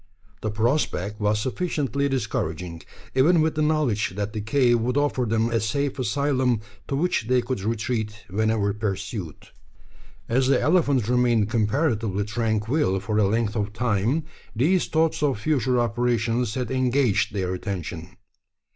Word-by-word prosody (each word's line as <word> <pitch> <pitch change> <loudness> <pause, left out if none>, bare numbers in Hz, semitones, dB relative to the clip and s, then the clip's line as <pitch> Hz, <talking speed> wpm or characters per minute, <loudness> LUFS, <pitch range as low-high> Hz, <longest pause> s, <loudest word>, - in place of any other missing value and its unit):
The 110 - -1
prospect 105 -3 0
was 105 +1 +2
sufficiently 140 - -1
discouraging 90 - -3 0.3
even 160 +7 +4
with 155 0 +2
the 155 - -1
knowledge 130 - +1
that 105 +1 -3
the 105 - -3
cave 120 +2 +3
would 125 +4 -1
offer 145 -4 +1
them 115 +1 +1
a 115 - +2
safe 140 +6 -1
asylum 130 -1 +1 0.3
to 140 - -1
which 145 -7 0
they 125 0 +3
could 125 -3 -3
retreat 110 0 -2
whenever 105 0 0
pursued. 95 - -5 0.8
As 130 +3 +2
the 135 - +4
elephant 145 - +2
remained 120 -3 +2
comparatively 110 - 0
tranquil 110 +1 0
for 105 +2 -1
a 105 - +4
length 110 +1 0
of 105 -1 -2
time, 120 +6 0 0.3
these 165 +11 +2
thoughts 160 -1 +1
of 140 -6 +1
future 130 -2 +1
operations 120 0 0
had 125 -2 -3
engaged 130 -3 +2
their 95 -2 -2
attention. 90 -2 -5
115 Hz, 145 wpm, -24 LUFS, 105-130 Hz, 0.8 s, even